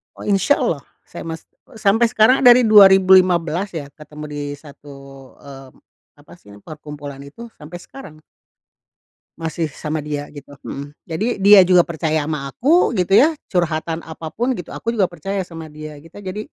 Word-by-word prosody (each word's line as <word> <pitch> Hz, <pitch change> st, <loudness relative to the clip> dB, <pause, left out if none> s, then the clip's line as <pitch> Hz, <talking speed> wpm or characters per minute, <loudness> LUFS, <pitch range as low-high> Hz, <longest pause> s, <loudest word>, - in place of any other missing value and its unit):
Oh, -, -, -14 dB
insyaallah, 205 Hz, +8 st, +1 dB, 0.3 s
saya -, -, -9 dB
mas 160 Hz, -1 st, -6 dB, 0.3 s
sampe 220 Hz, +1 st, +2 dB
sekarang 230 Hz, +4 st, +3 dB
dari 245 Hz, 0 st, +8 dB
2015 190 Hz, -4 st, +5 dB
ya 145 Hz, -4 st, -6 dB
ketemu 150 Hz, 0 st, -11 dB
di 145 Hz, 0 st, -6 dB
satu, 145 Hz, 0 st, -14 dB, 0.5 s
eee, 135 Hz, -1 st, -12 dB, 0.4 s
apa -, -, -19 dB
sih 105 Hz, -, -18 dB
perkumpulan 150 Hz, -1 st, -10 dB
itu 230 Hz, +12 st, -12 dB
sampe 170 Hz, +4 st, -11 dB
sekarang. 160 Hz, -, -13 dB, 1.2 s
Masih 165 Hz, 0 st, -3 dB
sama 155 Hz, +1 st, -5 dB
dia 150 Hz, -1 st, -5 dB
gitu, 145 Hz, -1 st, -13 dB
mhm. 140 Hz, +1 st, -8 dB, 0.2 s
Jadi 205 Hz, +6 st, -3 dB
dia 200 Hz, -1 st, +7 dB
juga 180 Hz, 0 st, +5 dB
percaya 160 Hz, -2 st, -2 dB
sama 145 Hz, -3 st, -5 dB
aku 315 Hz, -, +2 dB
gitu 195 Hz, -1 st, +2 dB
ya, 310 Hz, +5 st, +5 dB, 0.2 s
curhatan 165 Hz, -2 st, -2 dB
apapun 165 Hz, -, -4 dB
gitu. 180 Hz, -8 st, -8 dB
Aku 230 Hz, -, -4 dB
juga 200 Hz, -6 st, +1 dB
percaya 190 Hz, +4 st, -4 dB
sama 165 Hz, -3 st, -9 dB
dia 155 Hz, 0 st, -9 dB
kita 165 Hz, +7 st, -14 dB
jadi, 205 Hz, +2 st, -6 dB
165 Hz, 150 wpm, -19 LUFS, 150-200 Hz, 1.2 s, dari